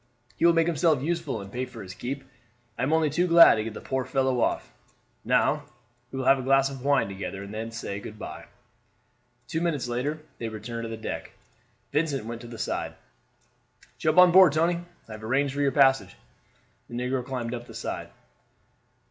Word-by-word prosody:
"He 170 - +4
will 170 - +6
make 165 -1 +3
himself 160 -4 +2
useful 165 -8 -2
and 100 0 -10
pay 125 +3 -2
for 120 -4 -10
his 95 -1 -9
keep. 135 +6 -5 0.5
I - - -5
am 130 +4 +1
only 160 -2 +3
too 175 +5 +1
glad 170 -1 +9
to 110 - -1
get 110 0 -6
the - - -7
poor 130 -1 -2
fellow 130 -2 0
off. - - -1 0.5
Now, - - +2 0.5
we 135 - -6
will 130 - -2
have 135 +1 +5
a - - -2
glass 135 +1 +3
of 135 -2 -8
wine 140 -5 +3
together 100 0 -6
and 100 +1 -9
then 110 +1 -4
say 115 -3 -5
good 105 +1 -9
by." 105 - -8 1.0
Two 160 -1 -2
minutes 155 -7 -1
later 125 +6 -2 0.2
they 115 - -3
returned 115 +2 -6
to - - -5
the 115 - -5
deck. 110 - -6 0.6
Vincent 145 -5 0
went 115 0 -6
to 120 - -9
the 115 -1 -9
side. - - -3 1.0
"Jump 155 +1 +1
on 180 -1 +8
board, 185 -4 +8
Tony. 170 +2 +2 0.3
I - - -12
have 110 0 -8
arranged 135 +4 +1
for 145 - -2
your 140 -1 +3
passage." 135 -2 +3 0.7
The 120 - -7
negro 125 +1 -1
climbed 125 -2 -4
up 120 0 -6
the - - -11
side. - - -5
130 Hz, 200 wpm, -27 LUFS, 115-150 Hz, 1.0 s, glad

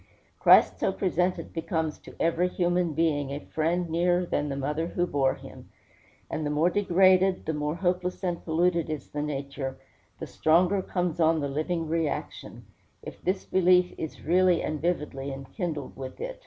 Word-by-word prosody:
Christ - - +6
so - - +1
presented 180 -2 -1
becomes 160 -2 -2
to - - -14
every 170 +2 +2
human 175 -2 0
being 150 -3 0
a 140 +1 -4
friend 165 +4 -1
nearer 175 +2 +1
than 145 -3 -1
the 135 - -3
mother 150 +4 -2
who 175 0 -1
bore 135 -5 +1
him; - - -13 0.6
and 155 - -3
the 145 - -1
more 155 +4 +2
degraded, 190 -1 +3
the 160 - -1
more 150 +1 -2
hopeless 180 +1 -1
and 175 -2 -2
polluted 170 0 +1
is 155 -4 -5
the 145 - -3
nature, 140 -2 -4 0.4
the - - -6
stronger 180 +5 +2
comes 180 -2 -2
on 160 0 +3
the 145 - -1
living 155 +4 -2
reaction, 160 -1 -3 0.4
if - - -9
this 185 +1 -1
belief 180 -1 +3
is 160 - -7
really 180 +1 +3
and 155 -1 -3
vividly 150 -5 -2
enkindled 145 - -5
with 130 -1 -8
it. - - -5
165 Hz, 170 wpm, -27 LUFS, 150-180 Hz, 0.6 s, Christ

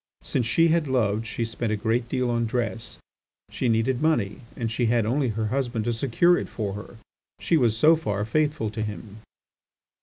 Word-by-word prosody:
Since 120 -3 0
she 165 +7 +3
had 160 -2 +2
loved 115 -4 0
she 115 +2 -2
spent 115 0 -3
a - - +1
great 115 +3 -1
deal 125 -1 0
on 115 -1 0
dress. 115 -1 -3 0.5
She 125 - -1
needed 115 +3 +1
money, 120 -11 +1 0.2
and 115 -2 -2
she 120 +1 0
had 115 -1 +2
only 130 +4 +1
her 110 0 -2
husband 120 -5 -1
to 120 - 0
secure 140 +9 +3
it - - -6
for 105 -4 -3
her; 105 +3 -9 0.4
she - - +1
was 120 -7 +2
so 155 +7 +6
far 105 -10 -2
faithful 150 -2 0
to 110 0 -4
him. 105 0 -6
115 Hz, 190 wpm, -25 LUFS, 110-130 Hz, 0.5 s, so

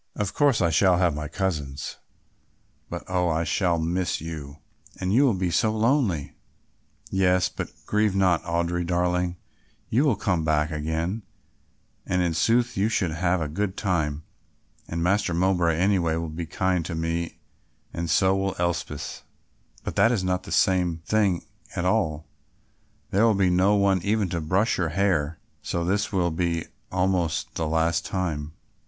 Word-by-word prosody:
Of 105 -2 -2
course 145 -7 +3
I 85 -2 +3
shall 90 +3 +4
have 90 -3 +2
my 75 0 -4
cousins, 75 -5 -3 0.9
but, - - -5
oh! 90 -1 +1
I 80 +1 +1
shall 85 0 +1
miss 85 +3 -1
you; 75 -3 -7 0.4
and 95 +1 -1
you 135 +5 +5
will 120 -7 +3
be 90 -1 -1
so 110 +5 +2
lonely." 110 - +1 0.8
"Yes, 90 -1 +3
but - - -5 0.2
grieve 105 -2 +1
not, 95 -4 +3
Audry, 85 0 -1
darling, 90 0 0 0.5
you 125 +6 +3
will 140 -7 +3
come 90 -7 0
back 75 0 +1
again, 80 +7 -2 0.9
and 90 0 +1
in 85 -2 0
sooth 120 +8 +2
you 100 +3 +1
should 90 -7 0
have 85 +2 0
a - - -2
good 95 +5 -2
time 80 -6 -1 0.6
and 85 0 -3
Master 95 -2 +1
Mowbray 90 -2 +2
anyway 90 -3 +2
will 85 0 -3
be 80 +1 -5
kind 90 0 0
to 85 - -4
me 80 +1 -2 0.6
and 85 -1 -3
so 95 +4 +3
will 95 0 -1
Elspeth." 85 -1 -3 0.6
"But - - -5
that 115 - +5
is 105 -6 0
not 90 0 0
the - - -9
same 90 -3 +2
thing 100 -5 +1 0.3
at 90 - -1
all; 80 -6 +1 0.9
there 100 +3 +3
will 115 -2 +4
be 95 -2 +3
no 95 +3 +4
one 100 -2 +3
even 105 -1 0
to 85 -1 -2
brush 95 +9 +1
your 85 -3 +1
hair, 85 -3 +1 0.2
so 85 - -2
this 100 +3 0
will 90 -3 +1
be 85 0 -1 0.3
almost 90 -3 0
the 80 - -2
last 80 +1 +1
time." 80 -5 -3
90 Hz, 165 wpm, -25 LUFS, 80-95 Hz, 0.9 s, you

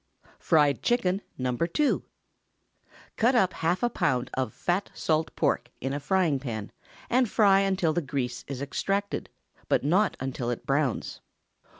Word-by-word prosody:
FRIED 150 -4 +3
CHICKEN 200 -6 +1 0.2
(No. 125 -1 -1
2). 170 - +1 1.1
Cut 240 +3 +3
up 190 -6 +3
half 175 +6 -1
a 240 - +3
pound 125 -9 0
of 130 -4 -1
fat 180 - -1
salt 160 0 0
pork - - 0
in 135 +2 -3
a 145 - -2
frying 165 -2 +1
pan, 110 -6 -5 0.4
and 250 -1 +2
fry 200 -3 +5
until 190 -5 +1
the 175 - 0
grease 125 -4 -3
is 140 -1 -4
extracted, 195 +8 -2 0.4
but - - +2
not 185 +8 +2
until 130 -2 -3
it 120 - -4
browns. 140 -3 -1
160 Hz, 150 wpm, -27 LUFS, 135-195 Hz, 1.1 s, fry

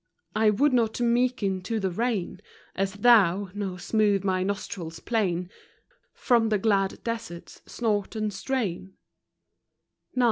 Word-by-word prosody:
I 215 0 +4
would 265 +7 +2
not 230 -2 +1
meeken 235 -5 +1
to 225 +2 -1
the 190 -2 -1
rein, 205 -3 -2 0.3
As 195 0 -1
thou, 205 -4 +4
nor 200 -3 -4
smooth 205 0 +1
my 185 -1 0
nostril 190 -3 -3
plain 180 0 -1 0.7
From 235 -3 +2
the 215 - +2
glad 195 -2 0
desert's 230 -7 -6
snort 215 -3 -1
and 215 -1 -2
strain. 190 -5 -3
205 Hz, 120 wpm, -26 LUFS, 190-230 Hz, 0.7 s, I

